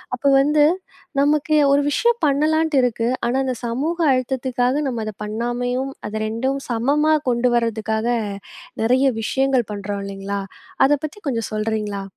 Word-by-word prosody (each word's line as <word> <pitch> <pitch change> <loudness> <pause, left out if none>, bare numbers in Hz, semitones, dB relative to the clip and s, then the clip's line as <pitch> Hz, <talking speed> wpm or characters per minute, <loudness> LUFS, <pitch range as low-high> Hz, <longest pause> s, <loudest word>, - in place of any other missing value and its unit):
அப்போ 265 +3 -2
வந்து, 295 +1 +3 0.6
நமக்கு 300 +2 +2 0.2
ஒரு 280 +1 +4
விஷயம் 470 +10 +2
பண்ணலான்ட்டு 310 +2 +2
இருக்கு. 235 -2 0 0.2
ஆனா, 240 +2 0
அந்த 260 - -1
சமூக 275 +9 -2
அழுத்தத்துக்காக 255 +1 0
நம்ம 235 -4 -3
அத 215 - -3
பண்ணாமையும், 245 +4 -2 0.2
அத 215 +1 -4
2ம் 260 +5 -1
சமமா 285 +7 +2 0.2
கொண்டு 245 +1 +2
வரதுக்காக 220 -1 0 0.7
நிறைய 255 +4 +3 0.2
விஷயங்கள் 265 0 +1
பண்றோம் 200 0 -4
இல்லைங்களா? 200 0 -4 0.4
அத 270 - +2
பத்தி 310 - -8
கொஞ்சம் 230 -5 -2
சொல்றீங்களா? 215 -2 -2
245 Hz, 135 wpm, -21 LUFS, 220-275 Hz, 0.7 s, ஒரு